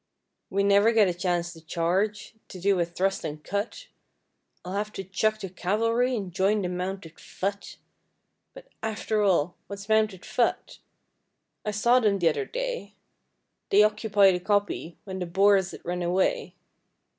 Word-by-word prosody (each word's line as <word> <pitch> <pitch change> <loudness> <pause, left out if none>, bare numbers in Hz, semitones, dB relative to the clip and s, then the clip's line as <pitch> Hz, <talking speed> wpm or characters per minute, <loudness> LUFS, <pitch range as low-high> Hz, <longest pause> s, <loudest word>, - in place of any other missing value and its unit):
We 200 +1 +1
never 200 +3 +4
get 215 -3 +5
a 180 - 0
chance 175 -1 -1
to 160 - -14
charge, 185 +7 -1
to 185 - -10
do 195 +1 +2
a 170 - +2
thrust 190 +3 -1
and 150 0 -6
cut, 205 - -4 0.8
I'll 180 - -5
have 210 +1 -2
to 195 - -5
chuck 215 +3 0
the 195 - -5
Cavalry 230 +7 0
and 195 -6 -5
join 200 +3 +2
the 180 - -1
Mounted 180 -2 -5
Fut. 200 +1 -5 0.8
But - - -11 0.2
after 220 0 -1
all 180 -4 +2
What's 200 0 -8
Mounted 215 -4 +1
Fut? 240 - -1 0.8
I - - -2
saw 235 +4 +3
them 210 -4 +2
t'other 185 - +1
day, - - -4 0.7
They 205 +2 +6
occupied 210 -2 +4
a 180 - -1
Koppie 205 -3 -1
when 190 -2 -6
the 180 - -3
Boers 195 +1 +4
had - - -11
run 180 +1 -2
away. 190 - 0
200 Hz, 155 wpm, -26 LUFS, 180-215 Hz, 0.8 s, They